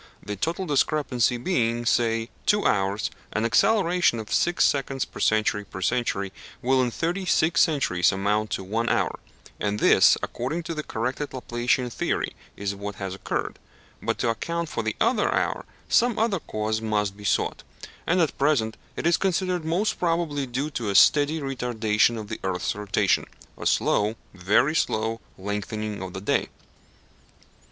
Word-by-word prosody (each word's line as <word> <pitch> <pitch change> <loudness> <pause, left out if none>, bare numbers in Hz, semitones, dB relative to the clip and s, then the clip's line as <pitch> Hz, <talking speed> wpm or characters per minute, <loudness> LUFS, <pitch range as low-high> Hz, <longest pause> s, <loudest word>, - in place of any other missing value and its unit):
The 105 - -3
total 165 - -2
discrepancy 140 -5 +1
being, 120 -5 0
say, 115 0 +1 0.2
two 210 0 +3
hours, 100 +1 +1 0.2
an 110 - 0
acceleration 175 - +3
of 110 -2 -5
six 175 0 +3
seconds 135 -1 0
per - - -12
century 110 -1 +2
per 95 - -9
century 100 -4 0 0.3
will 130 +1 +2
in 125 - +1
thirty 170 - -2
six 160 -3 +3
centuries 140 - +2
amount 105 +2 0
to - - -3
one 115 +5 -1
hour; - - 0 0.4
and 105 0 -1
this, - - +6
according 155 +8 -3
to 165 - -4
the 155 - -3
corrected 130 +3 -3
Laplacian 125 0 0
theory, - - -1 0.2
is 100 0 -2
what 100 0 -6
has 95 -1 -5
occurred. 95 - -4 0.4
But - - -1
to 120 - 0
account 170 +8 -2
for - - -2
the 110 -1 -2
other - - +2
hour - - -1 0.2
some 240 -1 +3
other 215 -4 +1
cause 110 -4 -2
must 105 -3 -1
be 105 - -13
sought, - - 0 0.5
and 180 - +3
at 160 - +1
present 135 -6 +1 0.2
it - - -4
is 170 0 +4
considered 185 -2 0
most 175 +7 0
probably 165 -5 0
due 135 +5 -3
to 120 -6 -3
a 100 - -1
steady 145 +8 +5
retardation 120 -4 +1
of 105 - -7
the - - -5
earth's 90 -1 -1
rotation 105 -1 +1 0.3
a - - -3
slow, 105 +2 +2 0.2
very 100 - +2
slow, 110 -5 0 0.2
lengthening 105 +1 -4
of 95 -1 -6
the 95 - -6
day. 100 - 0
120 Hz, 160 wpm, -25 LUFS, 105-155 Hz, 0.5 s, this